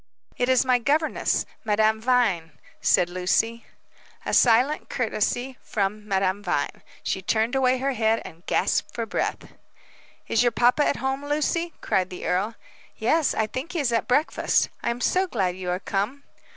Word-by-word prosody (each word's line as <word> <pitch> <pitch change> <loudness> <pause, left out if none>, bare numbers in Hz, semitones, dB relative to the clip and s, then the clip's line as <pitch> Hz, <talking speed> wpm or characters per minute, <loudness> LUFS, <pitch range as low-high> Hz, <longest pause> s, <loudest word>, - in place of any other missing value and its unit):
"It 245 +1 0
is 260 0 +4
my 250 -1 +3
governess, 300 +6 +1 0.2
Madame 220 0 +2
Vine," 220 -10 +1 0.3
said 175 - +3
Lucy. 190 +6 0 0.6
A - - -2
silent 250 +5 +3
courtesy 245 +2 -1
from 210 +1 -2
Madame 195 0 0
Vine. - - -2 0.2
She 190 - -2
turned 220 +5 0
away 260 -1 +3
her 270 +2 -1
head 225 -1 +2
and 165 +2 -11
gasped - - 0
for 230 -1 -2
breath. 220 - -3 0.7
"Is 225 - +2
your 240 -1 +2
papa 250 +6 +3
at - - +1
home, 265 +1 -2
Lucy?" 305 +3 -1
cried 185 -1 0
the 180 - -7
earl. 200 +5 0 0.4
"Yes; 305 +7 +2
I 220 - +1
think 260 +10 -6
he 340 - -1
is 255 -5 0
at 230 - 0
breakfast. 290 +5 +2
I'm 235 +1 -2
so 370 +9 +2
glad 190 - -1
you 185 -1 -5
are 180 +1 -1
come!" 210 +9 -2
230 Hz, 165 wpm, -25 LUFS, 205-265 Hz, 0.7 s, is